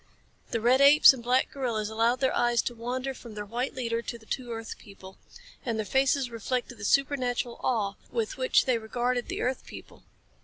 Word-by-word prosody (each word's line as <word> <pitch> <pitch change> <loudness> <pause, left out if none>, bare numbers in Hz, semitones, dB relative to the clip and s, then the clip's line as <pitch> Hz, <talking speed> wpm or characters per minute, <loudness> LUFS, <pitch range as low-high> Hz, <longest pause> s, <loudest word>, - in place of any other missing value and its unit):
The 230 - -1
red 250 +4 +3
apes 285 +1 +8
and 260 - -8
black 250 +2 +1
gorillas 235 -6 -2
allowed 230 +3 +1
their 265 - +1
eyes 240 -1 +2
to 245 - -3
wander 250 +3 -4
from 235 -4 -12
their 210 0 -5
white 245 +7 -3
leader 230 -2 -2
to 235 - -6
the 225 - -20
two 245 +1 -4
earth 225 -1 -6
people. 195 -3 -14 0.4
And 230 -3 -2
their 220 - -2
faces 265 +1 +1
reflected 240 +1 -3
the 200 - -5
supernatural 250 -2 0
awe 215 -6 0 0.2
with 225 -3 -2
which 255 0 +2
they 250 -3 +1
regarded 245 +2 -2
the - - -4
earth 255 +1 -1
people. - - -12
240 Hz, 195 wpm, -28 LUFS, 225-255 Hz, 0.4 s, apes